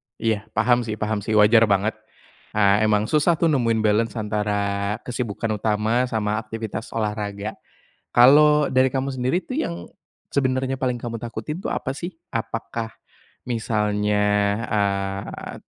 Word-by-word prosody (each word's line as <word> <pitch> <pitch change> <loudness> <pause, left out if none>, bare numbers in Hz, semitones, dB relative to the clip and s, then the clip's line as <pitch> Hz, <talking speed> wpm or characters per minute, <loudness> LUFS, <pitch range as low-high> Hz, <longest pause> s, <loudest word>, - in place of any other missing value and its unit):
Iya, 110 -1 -1
paham 120 +3 +3
sih 110 -2 -4
paham 105 0 -2
sih, 110 +2 -2
wajar 110 +2 +6
banget. 100 +2 +2 0.6
Eee, 105 +1 +4
emang 105 -1 +2
susah 155 +6 +3
tuh 165 0 +2
nemuin 115 -5 +1
balance 110 +1 +1
antara 105 -2 -1
kesibukan 115 -3 -3
utama 110 +4 +1
sama 110 -2 -1
aktivitas 110 0 -6
olahraga. 105 -1 -3 0.6
Kalau 150 +4 +6
dari 130 0 +3
kamu 135 0 -2
sendiri 130 +6 0
tuh, 255 - -5
yang 85 0 -5 0.5
sebenarnya 130 -1 +1
paling 125 -2 -1
kamu 115 -1 -5
takutin 120 - -5
tuh - - -3
apa 130 - -2
sih? 175 +5 -5 0.2
Apakah, 115 0 -3 0.6
misalnya, 105 -3 0 0.4
eee, 100 -1 -2
110 Hz, 135 wpm, -23 LUFS, 105-125 Hz, 0.6 s, wajar